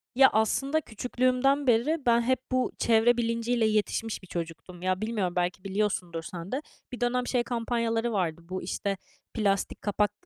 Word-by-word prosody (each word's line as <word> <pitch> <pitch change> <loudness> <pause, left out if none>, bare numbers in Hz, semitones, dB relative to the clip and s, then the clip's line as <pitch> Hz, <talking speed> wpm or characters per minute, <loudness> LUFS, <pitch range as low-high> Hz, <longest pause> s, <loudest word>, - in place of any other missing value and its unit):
Ya, 265 +1 +8
aslında 275 +8 +2
küçüklüğümden 255 +4 +1
beri 265 +6 +2
ben 235 -1 +5
hep 255 +1 +1
bu 255 0 +1
çevre 230 +1 +4
bilinciyle 230 0 +1
yetişmiş 215 0 0
bir 185 - -14
çocuktum, 170 +1 -6
ya, 185 +1 0
bilmiyorum, 210 -5 -1
belki 180 +1 -1
biliyorsundur 190 -4 -1
sen 170 +2 -7
de. 270 +3 -1 0.3
Bir 250 - -7
dönem 245 +1 +1
şey 245 -2 +1
kampanyaları 230 -1 -1
vardı 170 -4 -1
bu, 185 0 -3
işte, 195 +2 -2 0.4
plastik 200 -3 0
kapak 205 0 +1
225 Hz, 160 wpm, -28 LUFS, 190-245 Hz, 0.4 s, Ya